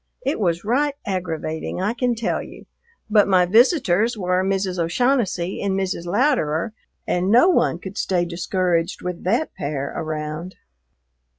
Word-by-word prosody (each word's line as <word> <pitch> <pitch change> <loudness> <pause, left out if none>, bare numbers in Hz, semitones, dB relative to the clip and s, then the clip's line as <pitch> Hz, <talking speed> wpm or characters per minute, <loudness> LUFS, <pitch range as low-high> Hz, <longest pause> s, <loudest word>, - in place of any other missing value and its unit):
It 275 -1 0
was 170 -4 0
right 280 +6 +1
aggravating, 165 -5 -3
I 205 +4 0
can 245 0 0
tell 230 - -1
you, - - -11 0.4
but 210 -2 +4
my 185 -2 +4
visitors 225 - +3
were 180 -1 +1
Mrs. 190 -1 -1
O'Shaughnessy 190 0 0
and 195 -1 0
Mrs. 185 -3 -3
Louderer, 210 - +1 0.3
and 180 +2 0
no 245 - +6
one 350 - +2
could 190 +3 -7
stay 180 -2 +1
discouraged 175 0 -1
with 180 -1 -5
that 235 +11 0
pair 140 -4 -4
around. 155 +3 -4
185 Hz, 140 wpm, -22 LUFS, 170-225 Hz, 0.4 s, no